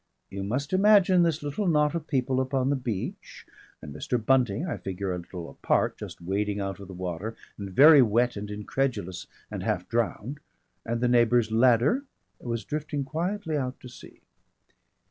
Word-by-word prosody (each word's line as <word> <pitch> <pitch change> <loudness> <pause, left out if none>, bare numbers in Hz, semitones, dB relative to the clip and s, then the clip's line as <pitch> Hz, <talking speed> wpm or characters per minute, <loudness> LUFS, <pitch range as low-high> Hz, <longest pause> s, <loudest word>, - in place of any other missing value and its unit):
You 100 - -5
must 130 - -3
imagine 190 -2 +5
this 165 -3 +1
little 145 +8 -2
knot 150 -2 +3
of 165 -2 -4
people 130 -2 0
upon 130 0 0
the - - +2
beach, 120 -7 -5 0.4
and 75 -2 -8
Mr. 75 - -2
Bunting, 125 - +1
I 170 - -3
figure, 95 0 -4
a 90 - -3
little 85 -1 -8
apart, 70 - 0
just - - -9
wading 100 +3 -1
out 95 0 -4
of 100 - -10
the 95 - -9
water 90 +5 -4 0.2
and 100 -1 -7
very 145 - +8
wet 120 +1 +2
and 100 0 -6
incredulous 105 -2 -3 0.2
and - - -4
half - - -2
drowned. 120 +4 -2 0.5
And 115 0 -1
the 125 - +3
neighbour's 120 -2 +3
ladder 125 - +3 0.4
was 115 -4 -4
drifting 150 -1 -3
quietly 165 +4 -3
out 130 -3 -3
to 125 - -10
sea. 125 - -14
125 Hz, 170 wpm, -27 LUFS, 100-145 Hz, 0.5 s, very